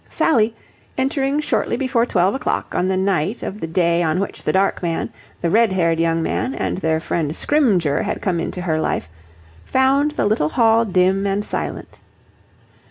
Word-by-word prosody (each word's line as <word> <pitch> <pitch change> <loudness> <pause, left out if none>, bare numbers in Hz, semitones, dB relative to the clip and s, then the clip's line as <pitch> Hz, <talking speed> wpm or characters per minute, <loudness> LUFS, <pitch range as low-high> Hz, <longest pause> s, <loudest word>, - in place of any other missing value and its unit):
Sally, 230 -7 +2 0.4
entering 270 +2 0
shortly 300 - -1
before 250 -3 +1
twelve 185 -1 +2
o'clock 270 - -2
on 180 - 0
the 190 0 0
night 190 +2 0
of 205 - -5
the 165 - -4
day 170 0 +1
on 160 +1 +1
which 200 - -4
the - - +1
dark 195 +1 +1
man, 170 -2 -2 0.3
the 170 - 0
red 225 0 +4
haired 165 -3 +1
young 165 0 +1
man, 260 - -2
and - - -2
their 160 -3 0
friend 160 -1 -2
Scrymgeour 200 - +2
had - - -3
come 180 -4 -1
into 180 +2 -4
her 160 -3 0
life, 80 - -2 0.5
found 270 +3 +2
the - - -1
little 205 -8 +1
hall 225 +3 +3
dim 190 0 +2
and 200 +1 -1
silent. - - -5
190 Hz, 175 wpm, -20 LUFS, 170-230 Hz, 0.5 s, red